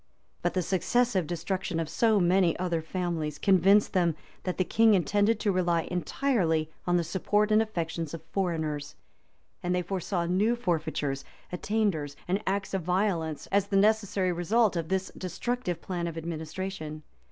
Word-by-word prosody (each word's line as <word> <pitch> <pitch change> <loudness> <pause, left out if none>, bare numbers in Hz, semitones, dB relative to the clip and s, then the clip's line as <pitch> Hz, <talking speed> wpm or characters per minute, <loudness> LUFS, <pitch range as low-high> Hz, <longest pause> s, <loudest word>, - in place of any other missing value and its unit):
But - - -1
the 185 - +1
successive 190 +1 +1
destruction 175 +1 -2
of 165 - -1
so 215 +6 +3
many 180 -1 +3
other 175 -2 -1
families 160 -3 -3
convinced 195 +3 +4
them 170 -4 +2 0.3
that 185 - -2
the 185 - +3
king 225 +3 +4
intended 205 +4 +2
to 210 - +2
rely 175 -3 +1
entirely 175 - 0 0.2
on 175 0 +3
the 170 - +1
support 205 +5 +1
and 215 +1 +5
affections 165 -6 -3
of 160 - -10
foreigners; 160 -6 -2 0.7
and 180 0 0
they 180 - 0
foresaw 180 -1 -2
new 200 +7 +2
forfeitures, 155 - -1 0.3
attainders, 180 -7 -1
and 190 +3 0
acts 195 0 -1
of 195 - 0
violence, 175 -4 0
as 200 0 +2
the 195 - +1
necessary 205 -2 +2
result 195 +5 +2
of 165 -1 -2
this 190 0 -1
destructive 185 +1 -3
plan 175 -2 -3
of 165 -1 -5
administration. 160 -1 -5
180 Hz, 155 wpm, -28 LUFS, 165-200 Hz, 0.7 s, and